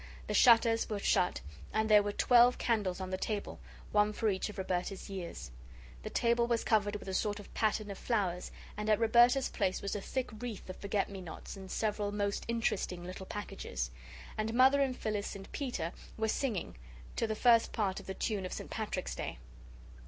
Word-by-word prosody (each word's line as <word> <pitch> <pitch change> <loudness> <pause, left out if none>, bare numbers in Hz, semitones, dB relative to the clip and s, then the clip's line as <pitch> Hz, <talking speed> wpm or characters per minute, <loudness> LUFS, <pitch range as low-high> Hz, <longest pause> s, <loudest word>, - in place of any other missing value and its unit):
The - - -3
shutters 230 -2 +5
were 210 - -1
shut 185 -2 +2 0.3
and 220 0 +1
there 210 -1 +7
were 205 0 -2
twelve 245 +3 +5
candles 205 -6 0
on 185 0 -5
the 185 - -2
table, 210 -2 -3 0.3
one 210 0 +3
for 220 +1 +1
each 190 +1 -1
of 210 - -9
Roberta's 185 +1 -3
years. 175 - -6 0.5
The - - -5
table 235 0 +2
was 235 -1 +1
covered 205 -2 +2
with 205 - -7
a 190 - -3
sort 205 +2 0
of 205 - -12
pattern 215 -1 0
of 195 - -7
flowers, 190 -7 -1 0.3
and 210 +1 -3
at 215 - +5
Roberta's 240 +4 +5
place 190 -4 0
was 200 - -3
a 205 - -3
thick 260 +4 -3
wreath 235 -5 -5
of - - -11
forget 200 0 -1
me 195 -1 -7
nots 175 +2 -8
and 190 -1 -9
several 210 -1 -1
most 205 -1 -1
interesting 215 -6 -1
little 185 +1 -7
packages. 65 - -4 0.5
And 220 +1 -1
Mother 265 +3 +6
and 265 -2 0
Phyllis 210 -2 -2
and 195 -1 -10
Peter 220 - -3 0.2
were 220 0 0
singing 215 - -2 0.4
to 230 - 0
the 220 - -1
first 230 0 +5
part 195 -4 -1
of - - -13
the 190 - -4
tune 205 -2 -1
of 185 - -4
St. - - -7
Patrick's - - -3
Day. - - -5
210 Hz, 195 wpm, -33 LUFS, 190-230 Hz, 0.5 s, there